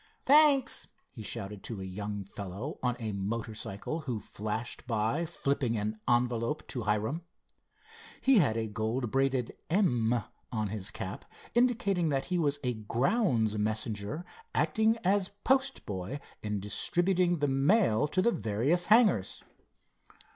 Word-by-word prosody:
Thanks!" 285 -2 +5 0.2
he 115 - -9
shouted 100 -1 -4
to 115 -4 -5
a - - -5
young 100 +2 -4
fellow 100 - -6
on 125 -1 +1
a 110 -2 -3
motor 105 +3 -3
cycle 105 +9 -4
who 130 -8 -3
flashed 110 +4 -5
by, 115 +8 0
flipping 140 -7 -1
an 105 +1 -2
envelope 120 +3 +1
to 125 - -3
Hiram. 110 +8 0 1.0
He 265 -5 +5
had 125 -10 +2
a 110 -1 -1
gold 110 +3 -2
braided 135 -2 +1
"M" 120 - +2 0.3
on 110 -4 -1
his 100 -1 -3
cap, 95 0 -6 0.3
indicating 220 -8 +2
that 135 -2 0
he 180 - +2
was 145 -3 +1
a 125 -1 +1
grounds 115 - +1
messenger 110 - -2 0.3
acting 220 +1 +3
as 195 +1 +1
postboy 140 - 0 0.2
in 105 -1 -2
distributing 175 - +1
the 145 -1 +1
mail 140 - +3
to 185 +5 +1
the 235 - +4
various 120 - 0
hangars. 210 - +4
120 Hz, 135 wpm, -30 LUFS, 105-175 Hz, 1.0 s, Thanks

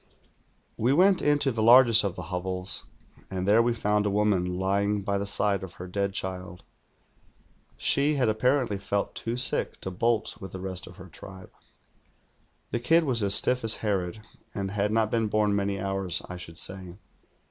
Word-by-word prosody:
"We 125 +4 +2
went 185 +4 +4
into 145 -2 +2
the 115 -2 -3
largest 115 -1 +7
of 100 -4 -2
the - - -7
hovels, 90 +1 -3 0.4
and 95 -1 -4
thei'o 105 +4 +4
we 120 - +1
foimd 105 -2 0
a - - +1
woman 100 -3 0
lying 100 +2 0
by 100 0 -1
the 100 - -4
side 100 -1 0
of 95 -2 -9
her 90 - -8
dead 100 +2 -2
child. 90 -2 -6 1.1
She 145 +2 +2
had 130 -4 +1
apparently 115 0 0
felt 100 0 -2
too 115 +1 -4
sick 125 - 0
to 95 - -5
bolt 115 +5 -1
with 95 0 -8
I - - -4
lie 95 - -9
rest 95 -1 -6
of 90 - -13
her 95 -1 -12
tribe. 95 +2 -12 1.2
The 120 - -1
kid 165 +8 +3
was 125 -6 +1
as 100 -1 +5
stiff 125 -1 +4
as 115 0 +4
Ilerod, 100 0 -3 0.3
and 95 -1 -3
had 105 0 -1
not 110 -1 +1
been 115 -2 0
born 105 -1 +1
many 100 -1 -1
hours, 95 -3 -2
I 90 - -7
should 85 -2 -10
say. 95 -1 -5
100 Hz, 185 wpm, -26 LUFS, 95-115 Hz, 1.2 s, largest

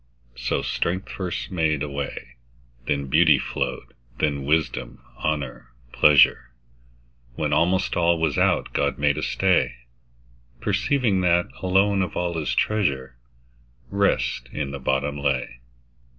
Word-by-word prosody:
So - - -2
strength 95 +3 -2
first 90 -1 -4
made 80 -5 0
a - - -3
way, 70 -3 -6 0.5
Then 70 -1 0
beauty 65 - +5
flow'd, - - -4 0.2
then 70 -2 -1
wisdom, 75 -4 -1 0.2
honour, 70 -5 -3 0.2
pleasure; 70 -4 +5 0.9
When - - -1
almost 90 +3 +1
all 85 0 +3
was 80 -4 0
out, - - +1
God - - 0
made 70 0 +1
a - - -4
stay, - - +1 0.8
Perceiving 105 - +1
that, 85 -1 +2
alone 95 +2 +2
of 90 -3 -3
all 90 0 -1
His 75 - -2
treasure, 70 - 0 0.8
Rest 100 -11 0
in 70 -2 -3
the 70 - -6
bottom 70 +2 -1
lay. 65 -4 -2
75 Hz, 125 wpm, -24 LUFS, 70-90 Hz, 0.9 s, beauty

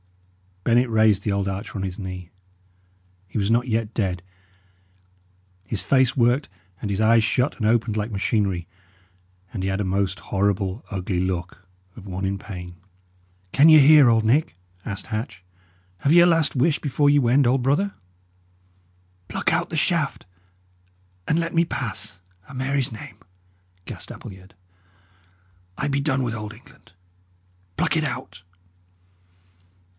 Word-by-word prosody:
Bennet 120 +3 +3
raised 110 -3 +3
the 105 - -1
old 100 -1 0
archer 95 +3 -5
on 95 - -3
his 95 +2 -5
knee. 90 -2 -7 1.0
He 95 - -6
was 100 +1 +1
not 120 +2 +2
yet 115 -1 -1
dead; 95 -6 -2 1.4
his 100 -2 -3
face 130 -3 +3
worked, 120 +4 +2 0.3
and 105 - -3
his 100 +1 -1
eyes 115 +1 +5
shut 125 +5 0
and 110 - -2
opened 110 -1 +1
like 105 +2 -2
machinery, 100 -4 -1 0.9
and 100 - -3
he 95 - 0
had 95 +1 -1
a - - 0
most 95 0 -1
horrible, 100 +1 -1
ugly 95 -2 -2
look 90 0 -3 0.3
of 100 -3 -11
one 95 +1 -4
in 95 +1 -2
pain. 90 -4 -8 0.8
"Can 150 +4 +6
ye 155 -1 +9
hear, 145 -2 +7
old 115 -1 +3
Nick?" 130 - +2 0.3
asked 100 -1 -5
Hatch. 110 -5 -5 0.6
"Have 140 - +2
ye 175 - +8
a - - +7
last 165 -4 +2
wish 145 +4 +2
before 145 0 +1
ye 145 0 +5
wend, 130 +2 +3
old 125 +2 +2
brother?" 150 +10 +1 1.3
"Pluck - - -1
out - - 0
the - - -5
shaft, - - 0 1.0
and 160 - +2
let 170 0 -2
me 165 +1 +4
pass, 110 - -4 0.3
a' 140 - -12
Mary's 135 0 -1
name!" 110 - -10 0.7
gasped - - -8
Appleyard. 95 -1 -12 1.2
"I - - -1
be 140 0 0
done 135 -2 0
with 120 -2 -2
Old 105 -1 -6
England. 110 - -19 0.9
Pluck - - +1
it 160 - +1
out!" 130 -9 -5
110 Hz, 150 wpm, -23 LUFS, 95-135 Hz, 1.4 s, ye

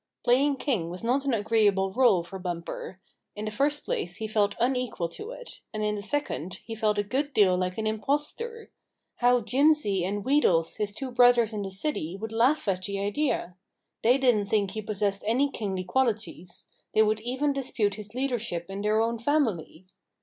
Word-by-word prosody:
Playing 275 +4 +3
king 235 - -1
was 180 +4 -7
not 260 +4 +1
an 275 - +1
agreeable 205 -3 +2
role 205 -6 +4
for 190 +3 -8
Bumper. 175 +1 -5 0.4
In 210 +1 -5
the 215 - -3
first 290 +6 0
place, 175 +1 -2
he 220 - -4
felt 205 -2 +1
unequal 250 -7 0
to 420 - -8
it; - - -10
and, 215 -1 -3
in 210 0 +1
the 205 - -4
second, 200 - -3
he 225 - -6
felt 215 -1 0
a 205 - +2
good 275 +7 -2
deal 190 -4 +5
like 180 0 -2
an 220 - -2
impostor. 295 - -2 0.5
How 245 0 +4
Jimsy 255 - +2
and 200 +2 -2
Wheedles, 190 - +2
his 210 -1 -1
two 265 +1 -5
brothers 245 -2 +5
in 210 - -3
the 195 - -4
city, 190 - -2
would 220 +1 -5
laugh 240 +5 +2
at 185 -2 0
the 200 -1 -3
idea! 205 - -1 0.5
They 245 +4 +4
didn't 240 -7 +2
think 200 -2 +1
he 215 - -4
possessed 200 -1 -1
any 265 +5 +2
kingly 195 -6 -3
qual 260 +8 +2
ities. 205 -6 -5 0.3
They 220 - +6
would 215 0 +1
even 260 +6 -1
dispute 240 -7 -1
his 210 +2 -9
leadership 235 -9 -2
in 195 +1 -4
their 210 +1 +2
own 230 +1 0
family. 225 - -1
215 Hz, 190 wpm, -27 LUFS, 195-255 Hz, 0.5 s, They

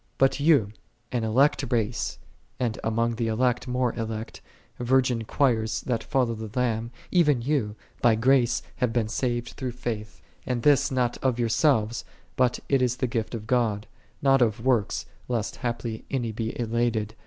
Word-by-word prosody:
'3 - - -42
But 135 +1 +3
you, 140 -9 +4 0.4
an 120 -3 -1
elect 135 +5 +3
race, 115 - -1 0.4
and 120 -4 -1
among 115 +1 0
the 115 -1 0
elect 120 +3 +1
more 125 -1 0
elect, 110 -1 -5 0.4
virgin 125 -2 +2
choirs 110 -4 +1
that 115 -3 -2
follow 130 -5 +1
the 110 -1 -6
Lamb, 115 -2 0 0.2
even 150 -9 +3
you 125 -7 0 0.3
"by 120 -2 +5
grace 125 +1 +3
have 125 -2 +1
been 115 -2 0
saved 120 +1 -1
through 130 -3 -5
faith; 110 -4 -5 0.2
and 125 -2 -2
this 140 -2 +4
not 125 -2 0
of 130 -3 +1
yourselves, 120 -1 +2 0.3
but 125 -1 +2
it 135 -2 +2
is 125 -1 +2
the 130 - 0
gift 115 -1 -2
of 110 -2 -6
God: 110 -4 +1 0.4
not 135 -1 +5
of 115 0 +1
works, 120 -6 +1 0.2
lest 115 -3 -2
haply 120 -2 -3
any 120 -4 -1
be 110 +2 -4
elated. 115 -2 0
120 Hz, 165 wpm, -26 LUFS, 110-130 Hz, 0.4 s, by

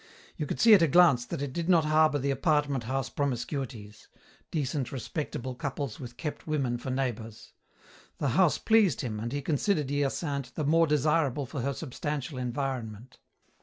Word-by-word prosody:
You 150 - -3
could - - -4
see 225 -1 +7
at 200 - +7
a 165 - +5
glance 155 -6 +5
that 140 - -4
it 135 -2 -4
did 170 +2 -3
not 165 -4 +5
harbour 155 -1 +4
the 140 0 -1
apartment 140 -2 +1
house 135 +2 -1
promiscuities: 125 -5 -4 0.4
decent, 140 -4 -2
respectable 130 -1 -4
couples 135 -1 -4
with 120 -2 -9
kept 150 +2 -5
women 135 -6 -1
for 130 - -6
neighbours. 120 -4 -4 0.6
The 145 - 0
house 170 +6 +3
pleased 220 - +3
him, 110 -4 -4
and 115 +2 -4
he 145 +1 -3
considered 150 -1 0
Hyacinthe 140 -1 -2
the 155 - -2
more 165 +3 +4
desirable 150 -1 +1
for 135 +1 -5
her 140 +3 -1
substantial 145 -2 -4
environment. 125 -2 -4
140 Hz, 165 wpm, -28 LUFS, 125-155 Hz, 0.6 s, see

